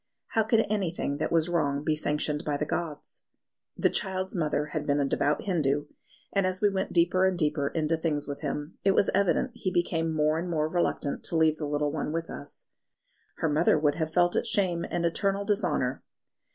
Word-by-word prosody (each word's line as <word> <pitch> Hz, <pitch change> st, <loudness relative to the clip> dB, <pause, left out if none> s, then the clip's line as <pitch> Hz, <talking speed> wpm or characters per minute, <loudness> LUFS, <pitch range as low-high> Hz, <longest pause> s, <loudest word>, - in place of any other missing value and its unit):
How 225 Hz, -, +2 dB
could 220 Hz, +1 st, +3 dB
anything 180 Hz, -8 st, -1 dB
that -, -, -2 dB
was 165 Hz, -1 st, +3 dB
wrong 145 Hz, -5 st, 0 dB
be 155 Hz, 0 st, +1 dB
sanctioned 150 Hz, 0 st, 0 dB
by 145 Hz, -1 st, -1 dB
the 150 Hz, -, -1 dB
gods? 155 Hz, -1 st, -5 dB, 0.6 s
The -, -, +2 dB
child's 190 Hz, -2 st, -1 dB
mother 150 Hz, -4 st, 0 dB
had 150 Hz, -1 st, -3 dB
been 145 Hz, 0 st, +2 dB
a 140 Hz, -, +2 dB
devout 145 Hz, +2 st, 0 dB
Hindu; 150 Hz, -6 st, 0 dB, 0.5 s
and 195 Hz, -2 st, +2 dB
as 185 Hz, 0 st, -2 dB
we 205 Hz, -1 st, +3 dB
went 190 Hz, 0 st, -2 dB
deeper 175 Hz, +2 st, +3 dB
and 185 Hz, -1 st, 0 dB
deeper 150 Hz, -3 st, +1 dB
into 160 Hz, +1 st, 0 dB
things 155 Hz, -3 st, -1 dB
with 140 Hz, -1 st, -5 dB
him, 145 Hz, +1 st, -4 dB
it 195 Hz, 0 st, +3 dB
was 200 Hz, -, +3 dB
evident 200 Hz, +6 st, +2 dB
he 215 Hz, -6 st, -2 dB
became 165 Hz, -2 st, 0 dB
more 155 Hz, 0 st, +1 dB
and 175 Hz, +1 st, -4 dB
more 155 Hz, -2 st, 0 dB
reluctant 160 Hz, -3 st, -1 dB
to 165 Hz, -, 0 dB
leave 160 Hz, -1 st, +3 dB
the 150 Hz, -, -3 dB
little 145 Hz, 0 st, 0 dB
one 150 Hz, 0 st, -3 dB
with 165 Hz, +1 st, -3 dB
us. 145 Hz, -, -9 dB, 0.7 s
"Her -, -, -1 dB
mother 155 Hz, +2 st, +3 dB
would 150 Hz, -1 st, +2 dB
have 160 Hz, 0 st, -3 dB
felt 175 Hz, +1 st, +3 dB
it -, -, 0 dB
shame 185 Hz, -6 st, 0 dB
and 170 Hz, -1 st, -1 dB
eternal 195 Hz, +4 st, 0 dB
dishonour." 180 Hz, -11 st, 0 dB
160 Hz, 205 wpm, -28 LUFS, 150-185 Hz, 0.7 s, could